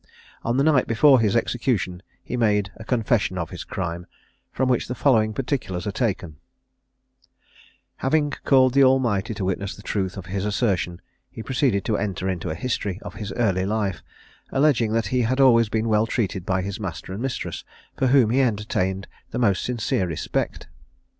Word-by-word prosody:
On 120 +2 -1
the 135 - +3
night 145 -4 +3
before 130 +4 +5
his 110 -2 +2
execution 115 -7 0 0.2
he - - -4
made 105 -4 +1
a 110 - -10
confession 110 -5 0
of 85 -2 -4
his - - -6
crime, 85 -1 -4 0.4
from 130 - 0
which 125 -2 +1
the 125 - -4
following 110 -6 +3
particulars 120 -7 -3
are 105 - -1
taken: 95 - -2 1.6
Having 145 +2 +1
called 130 -2 +4
the 140 0 +6
Almighty 120 -6 +2
to 100 -3 -3
witness 95 +1 -2
the 105 - -14
truth 95 -3 -2
of 95 - -7
his 95 +1 -3
assertion, 100 -5 -1 0.3
he 110 - -8
proceeded 125 -7 +1
to 110 - +1
enter 100 -2 -2
into 90 -3 -2
a 80 - -3
history 100 -2 -2
of - - -7
his 105 -3 -6
early 95 -6 +1
life, 100 -2 -1 0.5
alleging 135 -6 +2
that 115 0 +1
he 125 - +3
had 130 +3 0
always 115 -5 +5
been 110 +1 0
well 110 0 +2
treated 95 -6 -2
by 95 0 +1
his 100 +2 -5
master 95 -2 -5
and 100 - -5
mistress, 135 -1 -4 0.3
for 130 - +1
whom 125 -4 +4
he 135 +3 +3
entertained 100 -5 -1 0.2
the - - -5
most 100 -6 +2
sincere 115 -6 -1
respect. 80 - -3
110 Hz, 180 wpm, -23 LUFS, 95-125 Hz, 1.6 s, the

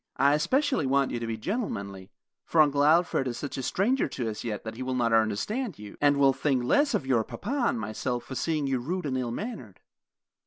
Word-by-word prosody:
I 140 +2 +4
especially 260 - +1
want 140 0 +2
you 120 - -2
to 115 - -4
be 115 -1 -3
gentlemanly; 100 - -4 0.3
for 165 - 0
Uncle 145 -2 +4
Alfred 155 -3 +3
is 120 -1 -3
such 145 - -5
a - - -2
stranger 225 - +1
to 120 -4 -3
us 105 - -7
yet 110 -3 -4
that 110 - -6
he 120 - -9
will 130 0 -2
not 120 -2 +1
understand 130 - 0
you, 105 -1 -10
and 145 -1 +4
will 135 -1 +5
think 130 -3 0
less 285 - +3
of 135 - -1
your 125 -4 +2
papa 245 - -3
and 120 - 0
myself 120 +3 -3
for 130 - -8
seeing 155 +2 -1
you 135 -2 0
rude 175 +8 -3
and 135 -2 -1
ill 125 -2 -1
mannered. 120 - -6
135 Hz, 225 wpm, -27 LUFS, 115-165 Hz, 0.3 s, will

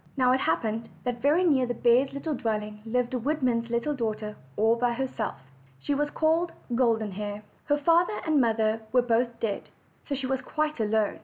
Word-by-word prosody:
Now 255 -1 +4
it 260 - +3
happened 220 +6 -1
that 245 -1 -3
very 300 +6 +3
near 275 -7 +3
the 245 - -2
bears' 255 +4 +3
dwelling 215 -8 -2
lived 245 +2 0
a 250 - 0
woodman's 250 -4 0
little 235 +6 0
daughter, 215 -4 -3 0.2
all 220 +2 +4
by 240 0 +1
herself. 245 -3 -3 0.4
She 285 - -2
was 295 +1 0
called 325 +3 +1 0.2
Golden 230 -4 +2
Hair. 205 +1 -5 0.2
Her 290 - +2
father 335 +7 +3
and 310 -3 +3
mother 220 -1 +1
were 250 0 +4
both 235 0 0
dead, 210 -3 -3 0.4
so 285 - -1
she 270 0 -4
was 265 0 -1
quite 305 +1 -2
alone. 215 -1 +1
245 Hz, 180 wpm, -27 LUFS, 220-280 Hz, 0.4 s, Now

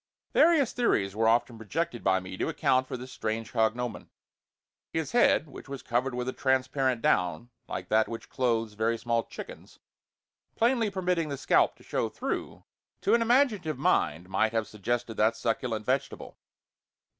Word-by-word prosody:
Various 315 -6 +4
theories 100 - +1
were 110 +1 +2
often 120 0 +2
projected 120 - -3
by 95 0 +3
me 90 0 -8
to - - -2
account 130 0 +1
for 130 - -4
this 125 +1 -9
strange 110 +1 -4
cognomen. 120 +1 -1 0.8
His 160 -1 -2
head, 235 -9 +4
which 140 0 -12
was 140 -1 -6
covered 125 +2 -1
with 125 0 -3
a 130 - -2
transparent 130 -2 0
down, 90 +6 +1 0.2
like 90 0 -5
that 110 0 +3
which 115 - -7
clothes 115 -4 0
very 110 +2 0
small 115 0 0
chickens, - - -10 0.8
plainly 235 -2 +2
permitting 180 -4 -1
the 140 - -3
scalp 135 - +3
to - - -20
show - - -1
through, - - -4 0.4
to - - +2
an 235 - +4
imaginative 230 - +2
mind 85 - +1
might 110 +3 +1
have 115 -1 0
suggested 115 +2 -3
that 110 +2 +3
succulent 115 -2 -2
vegetable. 135 +2 -2
120 Hz, 160 wpm, -28 LUFS, 110-145 Hz, 0.8 s, Various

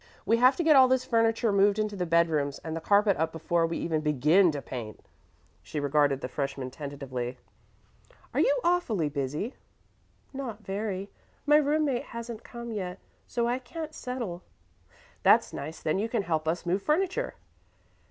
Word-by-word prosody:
We 225 +4 +3
have 250 +3 +5
to 345 - -1
get 315 -2 +6
all 260 -1 +8
this 255 0 +1
furniture 230 -1 +2
moved 200 +1 +4
into 215 -1 -1
the 180 -2 -2
bedrooms 160 -4 +2
and 160 0 -4
the 165 - -4
carpet 200 +2 +3
up 160 +1 0
before 165 +1 0
we 165 - -3
even 160 -2 -1
begin 150 +5 +4
to 145 - -4
paint." 120 -6 -8 0.6
She 95 - -5
regarded 145 -1 +2
the - - -3
freshman 135 -1 -4
tentatively. 135 -4 -5 1.0
"Are - - 0
you - - +3
awfully 235 - +1
busy?" 145 - -3 0.8
"Not 240 -6 -6
very. 195 0 -3 0.3
My 295 0 +6
room 305 +1 +2
mate 260 -4 0
hasn't 235 -1 -6
come 235 -1 -8
yet, 185 -4 -4 0.3
so 235 -1 0
I 245 +2 0
can't 310 +4 -7
settle." 235 - -5 0.8
"That's - - +4
nice; 155 +3 -6
then 155 +5 +1
you 220 +3 -1
can 225 -3 0
help 160 -3 -1
us 165 +2 -1
move 185 +3 0
furniture." 380 - 0
195 Hz, 170 wpm, -28 LUFS, 155-240 Hz, 1.0 s, all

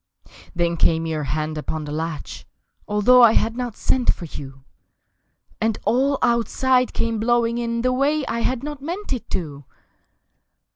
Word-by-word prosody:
Then 170 -1 0
came 165 0 +2
your 155 -2 -2
hand 155 +3 -2
upon 155 +1 -4
the 145 - -6
latch 160 0 -5 0.4
(Although 210 +5 +5
I 230 -2 +7
had 225 0 +1
not 245 -3 -4
sent 255 -2 +2
for 175 - -7
you) 135 -3 -9 1.0
And 220 -1 +1
all 270 +4 +2
Outside 250 +1 +2
came 230 -1 -1
blowing 235 +1 +1
in 235 0 -2
The 255 0 +2
way 280 +3 +1
I 235 - -2
had 255 +2 -1
not 295 -1 -6
meant 350 +4 -4
it 250 - -6
to! 145 -5 -4
230 Hz, 155 wpm, -22 LUFS, 165-255 Hz, 1.0 s, I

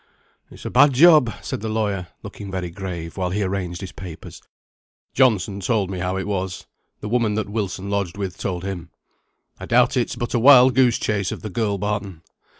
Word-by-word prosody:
"It's - - -14
a - - -4
bad 145 -1 +5
job," 150 -3 +6
said - - -4
the 110 - -3
lawyer, 105 -5 -2 0.2
looking 100 0 -8
very 90 -2 -4
grave, 85 -3 -6
while 90 -1 -1
he 100 +3 -1
arranged 95 -2 -3
his 95 - -7
papers. 90 -4 -10 0.7
"Johnson 105 -6 +2
told 100 -1 0
me 95 - -4
how 90 +2 -2
it 95 - -3
was; 95 -3 -3 0.4
the - - -5
woman 115 -2 +1
that 110 - -2
Wilson 100 -2 -3
lodged 100 -3 -2
with 95 -3 -4
told 90 -2 -3
him. 90 -3 -5 0.7
I - - -8
doubt - - +3
it's - - 0
but 120 - -4
a 120 - +2
wild 130 0 +7
goose 125 -2 +3
chase 100 -4 -1
of - - -7
the 110 - -5
girl 100 0 -1
Barton. 100 -4 -4
100 Hz, 195 wpm, -22 LUFS, 95-110 Hz, 0.7 s, wild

